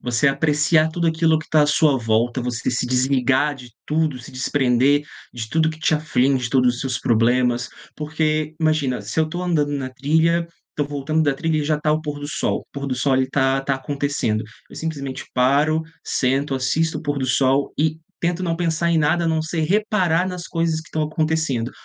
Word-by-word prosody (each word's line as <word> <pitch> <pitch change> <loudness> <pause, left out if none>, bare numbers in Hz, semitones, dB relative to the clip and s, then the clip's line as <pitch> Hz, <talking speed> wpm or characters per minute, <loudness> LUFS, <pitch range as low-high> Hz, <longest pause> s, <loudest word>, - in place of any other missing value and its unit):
você 125 +4 +1
apreciar 150 +2 +2
tudo 170 +1 -1
aquilo 160 -1 +2
que 155 - -8
está 155 -1 +3
à - - +3
sua 150 -1 +3
volta, 115 +2 0
você 120 0 -2
se 125 +1 -1
desligar 130 +2 +2
de 125 -3 -12 0.2
tudo, 155 -3 0
se 120 - -12
desprender 130 +1 +2 0.3
de 115 -2 -6
tudo 160 +3 +2
o 160 - +2
que 155 - -10
te 160 - +2
aflige, 135 -4 +1
de 115 - -3
todos 125 -2 +3
os 125 - -7
seus 125 -2 -2
problemas. 120 +1 +2 0.3
Porque, 155 0 -1
imagina, 155 -5 +1
se 160 - -2
eu - - +3
estou 175 +3 -5
andando 150 -5 0
na 135 -2 -3
trilha, 160 +6 +1 0.2
estou 145 -1 -2
voltando 145 +2 -1
da 145 -2 +2
trilha 160 +2 -1
e 150 - -1
já 150 +1 +1
está 150 0 0
o 155 - 0
pôr 150 -2 -5
do 145 0 -6
sol, - - -1
o - - -20
pôr 140 0 -5
do 130 - -1
sol 135 +2 0
ali 130 0 +3
está 135 0 +1
está 135 0 -1
acontecendo, 140 -5 -2 0.3
eu - - -12
simplesmente 140 -5 -5
paro, 145 +5 +3 0.2
sento, 135 +2 0
assisto 155 +5 0
o - - -9
pôr 145 -2 -2
do 130 - -2
sol 135 +2 +2
e 155 +1 +1 0.2
tento 175 +1 -1
não 165 -2 -1
pensar 170 -1 0
em 165 - +3
nada, 160 +3 +2
a - - +1
não 160 -1 +1
ser 160 +1 -3
reparar 185 -2 +1
nas 180 -2 -5
coisas 165 -2 0
que 160 - -15
estão 155 - -2
acontecendo: 155 -6 -1
145 Hz, 215 wpm, -21 LUFS, 130-160 Hz, 0.3 s, está